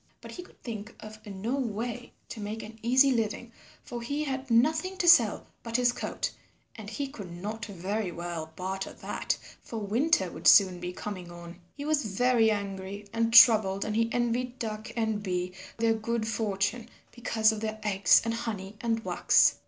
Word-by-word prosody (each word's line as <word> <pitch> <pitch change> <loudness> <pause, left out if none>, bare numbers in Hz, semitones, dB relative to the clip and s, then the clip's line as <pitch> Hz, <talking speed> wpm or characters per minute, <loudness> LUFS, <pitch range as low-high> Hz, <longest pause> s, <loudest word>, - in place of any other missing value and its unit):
But - - -11
he 360 - -7
could 355 - -18
think 220 -2 -7
of 215 0 -11
no 205 +6 -3
way 240 0 -4 0.2
to - - -7
make 215 +2 -5
an 220 +1 -11
easy 260 +4 +4
living, 230 0 -2 0.3
for 240 -1 -6
he 285 +6 -2
had 265 -2 -4
nothing 315 +11 +2
to 350 - 0
sell 235 -10 +6 0.2
but 230 0 -2
his 245 -1 +3
coat, - - -3 0.4
and 215 -2 -8
he 275 +6 -3
could 215 -10 -9
not 210 +6 -5
very 200 +1 -3
well 170 -2 -5
barter 190 +1 -4
that, - - -3 0.2
for 230 - -7
winter 215 - +1
would - - -3
soon 185 -3 +7
be 180 0 -4
coming 185 -2 -7
on. 170 0 -11 0.2
He 285 - -5
was 305 -1 +1
very 225 +2 +3
angry 200 -1 -4
and 230 0 +1
troubled 215 -4 +7
and 215 - -2
he 230 +1 +2
envied 245 +1 -1
Duck 215 -1 -5
and 220 -2 0
Bee 180 -2 -2 0.2
their 225 0 +2
good 225 0 -2
fortune 220 +1 -1 0.2
because 225 -2 +2
of 220 - -4
their 215 -1 -3
eggs 200 -2 +4
and 230 - 0
honey 215 -4 -5
and 225 -1 -1
wax. - - +4
220 Hz, 180 wpm, -28 LUFS, 200-240 Hz, 0.4 s, soon